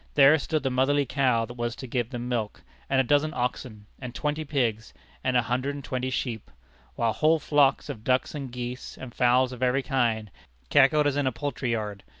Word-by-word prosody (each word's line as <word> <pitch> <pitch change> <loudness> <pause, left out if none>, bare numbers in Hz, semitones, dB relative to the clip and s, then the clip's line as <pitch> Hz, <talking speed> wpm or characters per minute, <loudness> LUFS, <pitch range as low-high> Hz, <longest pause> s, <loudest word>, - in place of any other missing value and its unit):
There 145 +3 +7
stood 155 +1 -2
the 135 - 0
motherly 140 +3 +2
cow 125 -3 +1
that 120 - -9
was 120 -1 -3
to 130 - -8
give 120 -2 -2
them 120 -2 -5
milk; 115 -4 -3 0.3
and 135 - +2
a - - +5
dozen 145 +4 +1
oxen, 120 -3 -3
and 125 -2 -7
twenty 150 +1 -2
pigs, 120 -7 -2 0.3
and 130 -1 +2
a 120 - +3
hundred 130 +4 -1
and 140 - -7
twenty 130 0 -2
sheep, 120 -4 -3 0.5
while 115 -1 +1
whole 155 +1 +3
flocks 145 -2 +2
of 110 - -7
ducks 130 +1 +1
and 140 -4 -6
geese, 125 +1 -6
and 125 -3 -9
fowls 125 +1 +3
of 125 -1 -9
every 130 +2 +2
kind, 115 -7 0 0.4
cackled 150 +3 +5
as 145 -1 +1
in 145 -2 +1
a - - +2
poultry 135 -2 -3
yard. 105 -3 -4
130 Hz, 205 wpm, -26 LUFS, 120-140 Hz, 0.5 s, There